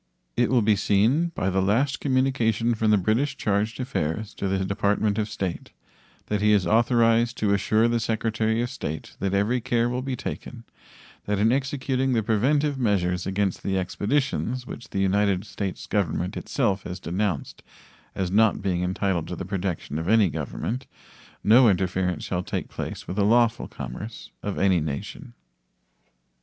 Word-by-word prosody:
It 120 -1 +2
will 125 -3 +3
be 105 0 +4
seen 110 - +2
by 95 - 0
the 95 +1 +1
last 115 +9 +1
communication 130 -4 +1
from 110 -1 +1
the 105 - +5
British 110 +9 0
charge 105 +2 0
d'affaires 110 - -3
to 100 - -3
the 95 0 0
Department 100 +1 +1
of 105 0 -1
State 95 -4 -4 0.5
that 105 -1 -1
he 105 0 +4
is 100 -3 +3
authorized 115 +2 +3
to 105 -2 +1
assure 110 +3 +2
the 120 0 +1
Secretary 110 0 0
of 120 - -4
State 80 - -6
that 100 0 0
every 110 +5 +1
care 120 +1 +1
will 125 +1 -2
be 130 0 -3
taken 120 -1 -6 0.6
that 105 0 0
in 110 +3 +3
executing 135 -1 0
the 115 -2 +1
preventive 135 +6 +1
measures 90 -6 0
against 95 -1 -1
the 95 -1 -1
expeditions 125 +5 -1
which 120 -3 -9
the - - -5
United 95 0 +2
States 100 -3 -5
Government 90 -3 -1
itself 100 -1 0
has 90 +1 -6
denounced 90 -3 -2 0.5
as 95 -2 -2
not 110 +1 +4
being 90 -3 -1
entitled 90 -2 -1
to 90 - -4
the 90 - -6
protection 90 -5 -3
of 80 - -4
any 110 -4 +5
government 95 - -4 0.6
no 115 +3 +7
interference 90 -2 0
shall 90 -1 -2
take - - -4
place - - -6
with 95 - -5
the 100 - +3
lawful 115 +2 +3
commerce 100 - -8
of 100 - -4
any 95 -3 +3
nation. 70 -5 -5
105 Hz, 165 wpm, -25 LUFS, 95-120 Hz, 0.6 s, no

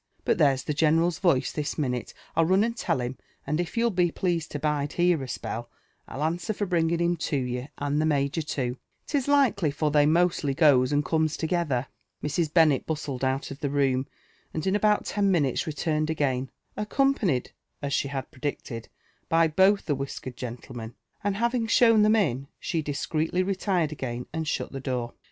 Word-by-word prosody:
But - - +2
there's 135 -3 +3
{h» 150 - -1
general's 165 +3 +2
voice 170 -9 +2
this 150 -1 -3
minulc, 125 -5 -2 0.2
I'll 165 0 +4
run 190 +3 +4
and 230 +1 -1
tell 135 - -1
him; 125 +2 -4 0.3
and 150 +3 -1
if 175 +6 -3
you'll 235 0 +3
be 175 -2 +2
pleased 170 -2 -1
to - - -1
bide 145 -1 -1
here 175 -3 +2
a 135 - -5
spell, 120 -1 -5 0.4
I'll 140 - -4
answer 175 +7 -1
for 205 - -1
bringing 170 -2 +1
him 170 +1 +1
to 150 - -2
yoUr««* 125 0 -2
and 145 +1 0
Ihe 155 - +2
major, 140 +1 +1
too, 130 -4 -3 0.3
'tis 280 -3 -1
likely, 245 - +3
for 150 +1 -1
they 145 0 +4
mostly 165 -4 +2
goes 140 -4 +5
and 145 0 +1
eomea 160 0 +1
together." 160 -6 0 0.4
Mrs. 150 +1 0
Bennet 155 -6 +4
bustled 145 -4 -3
out 135 +1 -1
of 140 - -8
the 145 - -1
room, 135 -2 +1 0.5
and 155 - -2
in 190 +1 +2
about 210 0 +2
ten 200 -1 +1
minutes 150 -9 +1
re 155 - -2
* - - -23
iurned 155 -1 0
again, 135 -4 0 0.3
accompanied, 210 - +1 0.3
as 140 -1 -2
she 140 - +1
had 135 -2 -5
predicted, 130 -4 -5 0.4
by 165 0 +4
both 190 +6 +3
the 145 - 0
wisia 135 0 -5
kered 130 -1 -7
gentlemen; 120 -1 -7 0.3
and 205 -1 0
having 235 +1 0
shown 230 -1 +5
them 215 +1 +5
in, 140 - 0
she 165 - -1
discreetly 155 +4 -1
retired 185 -4 0
again 125 -4 -4
and 160 -1 -3
shut - - -2
the 135 - -5
door. 125 -3 -3
155 Hz, 195 wpm, -26 LUFS, 135-175 Hz, 0.5 s, goes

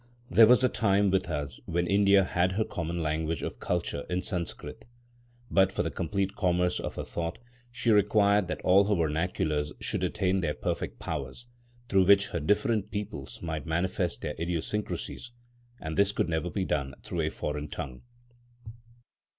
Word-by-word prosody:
There 110 -1 +8
was 125 +2 +6
a - - +6
time 100 -4 +2
with 95 -2 +1
us 70 -5 -4
when 85 +1 0
India 100 +1 +5
had 90 0 +1
her 110 +3 +1
common 85 -4 -3
language 80 0 -1
of - - -5
culture 70 - -2
in 90 +1 -1
Sanskrit. 90 -4 -5 0.7
But, 95 -1 +4
for - - -1
the - - -2
complete 100 +3 -2
commerce 90 -2 +1
of - - -5
her - - -4
thought, 85 +3 -4 0.3
she 120 -1 0
required 105 -1 +4
that - - -4
all 95 +2 +5
her 105 0 +2
vernaculars 80 -2 -1
should - - -1
attain 95 0 +1
their 85 -5 -1
perfect - - -3
powers, 75 - -5 0.4
through 95 -4 +4
which 100 +2 +5
her - - -2
different 105 - +1
peoples 100 -12 -6
might 80 -2 -4
manifest 90 +2 -1
their 75 - -2
idiosyncrasies; 90 +7 -3 0.5
and 80 0 -5
this 100 0 +3
could 100 - -1
never 80 +2 -1
be 95 +1 -2
done 70 -4 -2
through - - -2
a - - 0
foreign 75 0 -4
tongue. 65 -3 -6
90 Hz, 165 wpm, -28 LUFS, 80-100 Hz, 0.7 s, There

